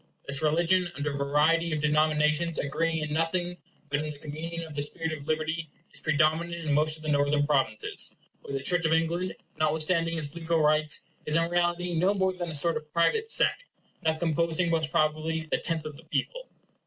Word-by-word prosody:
This 140 Hz, +2 st, +2 dB
religion, 170 Hz, +3 st, +2 dB
under 145 Hz, 0 st, -2 dB
a -, -, -4 dB
variety 150 Hz, +4 st, +2 dB
of 155 Hz, -, 0 dB
denominations 150 Hz, +2 st, +2 dB
agreeing 160 Hz, +2 st, -1 dB
in 150 Hz, 0 st, -3 dB
nothing 175 Hz, +2 st, -1 dB, 0.3 s
but 145 Hz, -, +1 dB
in 155 Hz, 0 st, -3 dB
the 150 Hz, -, -7 dB
communion 160 Hz, +3 st, -6 dB
of 160 Hz, -2 st, -9 dB
the 145 Hz, -, -2 dB
spirit 160 Hz, +2 st, -2 dB
of 145 Hz, -2 st, -7 dB
liberty, 155 Hz, 0 st, -1 dB, 0.2 s
is -, -, -9 dB
predominant 160 Hz, +2 st, +1 dB
in 150 Hz, -, +1 dB
most 155 Hz, +2 st, +2 dB
of 155 Hz, -, -15 dB
the -, -, -5 dB
Northern 145 Hz, 0 st, +2 dB
Provinces, 135 Hz, -7 st, 0 dB, 0.3 s
where 140 Hz, -, -4 dB
the 135 Hz, -, -6 dB
Church 175 Hz, +4 st, +2 dB
of 160 Hz, 0 st, +2 dB
England, 170 Hz, +3 st, 0 dB, 0.2 s
notwithstanding 160 Hz, +2 st, +1 dB
its 145 Hz, -2 st, -2 dB
legal 165 Hz, -1 st, 0 dB
rights, 155 Hz, 0 st, +2 dB, 0.3 s
is 150 Hz, -, 0 dB
in 165 Hz, 0 st, +3 dB
reality 175 Hz, 0 st, +1 dB
no 185 Hz, +5 st, +2 dB
more 190 Hz, -1 st, +1 dB
than 175 Hz, -2 st, -4 dB
a 160 Hz, -, -2 dB
sort 160 Hz, +2 st, +3 dB
of 155 Hz, 0 st, -10 dB
private 445 Hz, -, +2 dB
sect, -, -, +2 dB, 0.4 s
not 160 Hz, 0 st, +1 dB
composing 170 Hz, +1 st, +1 dB
most 160 Hz, -2 st, +1 dB
probably 160 Hz, 0 st, 0 dB
the -, -, +2 dB
tenth 165 Hz, -3 st, -2 dB
of 150 Hz, -1 st, -6 dB
the 160 Hz, +3 st, -12 dB
people. 160 Hz, -, -3 dB
160 Hz, 200 wpm, -28 LUFS, 150-170 Hz, 0.4 s, in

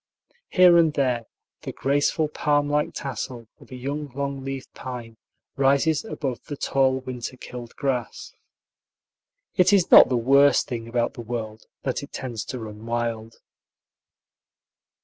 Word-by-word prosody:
Here 180 Hz, -2 st, +6 dB
and 165 Hz, -2 st, +4 dB
there 125 Hz, -5 st, 0 dB, 0.3 s
the -, -, -5 dB
graceful 145 Hz, +4 st, +1 dB
palm 145 Hz, -1 st, +1 dB
like 150 Hz, 0 st, 0 dB
tassel 125 Hz, -3 st, -5 dB
of -, -, -17 dB
a 130 Hz, -, -8 dB
young 140 Hz, +4 st, -4 dB
long 140 Hz, -1 st, -3 dB
leaved 135 Hz, -1 st, -6 dB
pine 120 Hz, -3 st, -8 dB, 0.4 s
rises 140 Hz, +3 st, +3 dB
above 135 Hz, -, -4 dB
the 145 Hz, -, -6 dB
tall 130 Hz, -1 st, +1 dB
winter 130 Hz, 0 st, -6 dB
killed 120 Hz, -2 st, -9 dB
grass. 130 Hz, -4 st, -3 dB, 1.2 s
It 185 Hz, 0 st, +5 dB
is 195 Hz, -4 st, +3 dB
not -, -, +10 dB
the 125 Hz, -, +1 dB
worst 140 Hz, +4 st, +4 dB
thing 115 Hz, -2 st, -5 dB
about 120 Hz, 0 st, -1 dB
the -, -, -8 dB
world 110 Hz, -2 st, -6 dB, 0.2 s
that -, -, -2 dB
it -, -, -10 dB
tends 120 Hz, -5 st, -5 dB
to 130 Hz, -, -5 dB
run 110 Hz, -2 st, -8 dB
wild. 115 Hz, -1 st, -3 dB
130 Hz, 145 wpm, -24 LUFS, 120-145 Hz, 1.2 s, not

